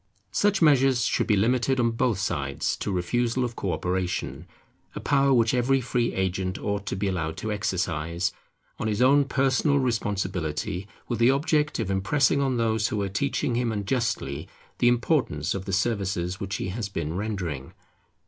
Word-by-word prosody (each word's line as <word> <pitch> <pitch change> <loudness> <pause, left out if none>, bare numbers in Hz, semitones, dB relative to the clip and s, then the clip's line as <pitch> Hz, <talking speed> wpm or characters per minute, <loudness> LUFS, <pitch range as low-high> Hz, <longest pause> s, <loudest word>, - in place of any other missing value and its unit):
Such 205 -3 +2
measures 135 -4 +4
should - - +1
be 110 - +4
limited 125 +5 +2
on 115 -1 +3
both 115 -2 +1
sides 70 -8 -1
to - - -3
refusal 120 +7 0
of 120 -1 -5
co 95 - -2
operation; 90 0 -2 0.5
a - - -3
power 140 -1 +2
which 115 -3 +4
every 130 +2 +3
free 120 -1 0
agent 95 0 -1
ought 100 -1 -3
to - - -1
be 100 +1 -1
allowed 80 -4 -2
to 110 - -3
exercise, 90 -4 -1 0.5
on 110 - -1
his 105 -1 -1
own 140 +3 +5
personal 135 +2 +2
responsibility, 95 - -2 0.2
with 120 - -2
the 120 +1 +5
object 150 +2 +1
of 110 -4 -2
impressing 135 +9 +2
on 135 -3 +1
those 110 -1 +1
who 110 -4 -2
are 100 - -2
teaching 130 +4 -1
him 120 -1 0
unjustly 100 - -2 0.3
the 120 - +4
importance 120 - +1
of 95 -1 -5
the 100 - -4
services 95 -3 -1
which 100 0 -3
he 95 - -3
has 105 +2 -3
been 80 -5 -3
rendering. 90 -10 -4
110 Hz, 170 wpm, -26 LUFS, 95-125 Hz, 0.5 s, own